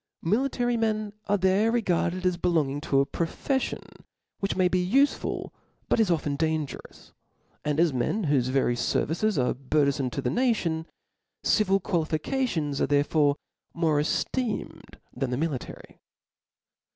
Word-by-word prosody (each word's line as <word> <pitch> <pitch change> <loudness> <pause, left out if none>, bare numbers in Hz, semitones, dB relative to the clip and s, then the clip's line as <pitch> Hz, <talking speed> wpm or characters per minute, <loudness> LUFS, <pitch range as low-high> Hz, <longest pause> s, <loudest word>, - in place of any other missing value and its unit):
Military 245 +4 +1
men 215 -2 -1
are 205 0 +3
there 190 +4 +3
regarded 185 -5 0
as 180 -1 +2
belonging 160 -5 0
to 135 -3 +2
a - - +1
profcflion 175 - -3 0.4
which 195 - -1
may 185 -1 +3
be 180 0 +1
ufcful, 280 +2 +1 0.4
but - - +2
is 220 -4 +3
often 150 -4 0
dan 155 0 0
gerous; - - -12 0.5
and 150 0 0
as 165 -3 +3
men 130 - 0
whofe 135 -4 +2
very 130 -2 +2
ferrices 165 - 0
are 125 -2 +2
bur 140 +3 +1
thenfome 140 -2 0
to - - -4
the 125 - -1
nadon:. 170 - 0 0.6
civil 195 -2 +3
qualifications 160 - -1
are - - +2
therefore 145 +1 +3 0.4
more 160 -3 +2
eftecnwd 225 - -2 0.2
than 130 0 -2
the 125 - -1
military. 145 -4 -5
165 Hz, 140 wpm, -27 LUFS, 145-210 Hz, 0.6 s, are